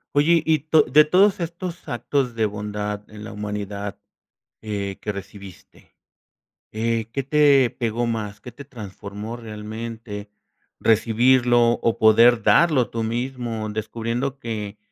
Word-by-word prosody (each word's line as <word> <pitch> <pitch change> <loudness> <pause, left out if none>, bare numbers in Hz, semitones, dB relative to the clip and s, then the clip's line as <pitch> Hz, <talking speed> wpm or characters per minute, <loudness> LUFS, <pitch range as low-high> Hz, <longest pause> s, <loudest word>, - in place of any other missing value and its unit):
Oye, 160 +3 +4
y 160 -2 +3
to 155 +1 +3
de 150 +3 +5
todos 190 +5 +4
estos 170 +1 -6
actos 120 +1 -1
de 110 -1 +1
bondad 105 0 -4
en 105 0 -10
la 110 - -8
humanidad, 105 -1 -5 0.6
eh, 100 -2 -4
que 105 - -3
recibiste, 100 -1 -12 0.8
eh, 115 0 -1
¿qué 135 -2 -2
te 140 -3 +4
pegó 120 0 -2
más? 105 -3 -4
¿Qué 125 - -10
te 140 +5 -11
transformó 105 -2 -8
realmente, 110 -1 -7 0.5
recibirlo 120 +2 +3
o 115 - +1
poder 115 +1 +5
darlo 150 -10 +4
tú 115 - -3
mismo?, 115 -1 -3
descubriendo 115 +5 -3
que 105 -4 -5
115 Hz, 130 wpm, -23 LUFS, 105-130 Hz, 0.8 s, de